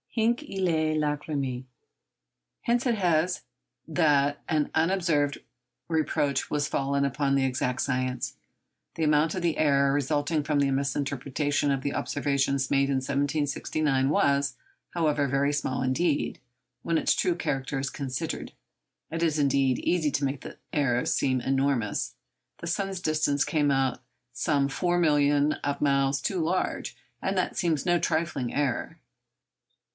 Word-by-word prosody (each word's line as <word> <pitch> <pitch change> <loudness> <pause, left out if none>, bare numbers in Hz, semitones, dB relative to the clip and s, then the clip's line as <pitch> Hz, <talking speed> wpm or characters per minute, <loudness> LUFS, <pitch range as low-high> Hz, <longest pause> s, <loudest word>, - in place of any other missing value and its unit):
Hinc 235 +1 +1
illæ 165 - 0
lacrymæ. 145 -4 -2 1.0
Hence 240 +2 +1
it 235 - +2
is 175 -2 +1 0.4
that 145 -3 +2
an 155 -3 +1
undeserved 160 -4 +1 0.5
reproach 150 -4 0
has 145 -1 0
fallen 140 0 0
upon 140 0 0
the 135 -1 +2
'exact 125 -1 -1
science.' 130 -1 -1 0.6
The 165 - -2
amount 150 +2 +3
of 185 - -2
the 170 -2 +1
error 140 -2 +3
resulting 145 +2 0
from 150 -1 +1
the 140 -1 +2
misinterpretation 140 +1 -1
of 135 -1 0
the 140 +1 -2
observations 140 +1 0
made 140 0 +3
in 140 - +1
1769 140 0 0
was, 140 -1 +2 0.4
however, 150 -4 +1
very 140 +2 +1
small 130 -3 -1
indeed, 145 +4 0 0.4
when 165 -1 0
its - - +3
true 180 -2 +1
character 140 -4 -2
is 135 0 -2
considered. 130 -3 -4 0.6
It 165 +1 -3
is, 155 -2 +1
indeed, 135 -3 +2
easy 170 -4 +1
to 140 +1 0
make 135 0 -3
the - - -9 0.2
error 125 -4 +1
seem 130 -2 +1
enormous. 135 -4 0 0.4
The 170 - -7
sun's 195 +2 -2
distance 155 -3 +1
came 150 -2 +1
out 135 -2 +1 0.3
some 140 +3 +1
four 175 +5 0
millions 145 -2 +3
of 145 0 -1
miles 140 -1 +2
too 190 - -1
large, 170 +3 -1 0.2
and 190 0 -1
that 185 - 0
seems 160 -5 0
no 175 -1 +3
trifling 155 -8 -1
error. 140 -4 -1
145 Hz, 140 wpm, -27 LUFS, 135-160 Hz, 1.0 s, amount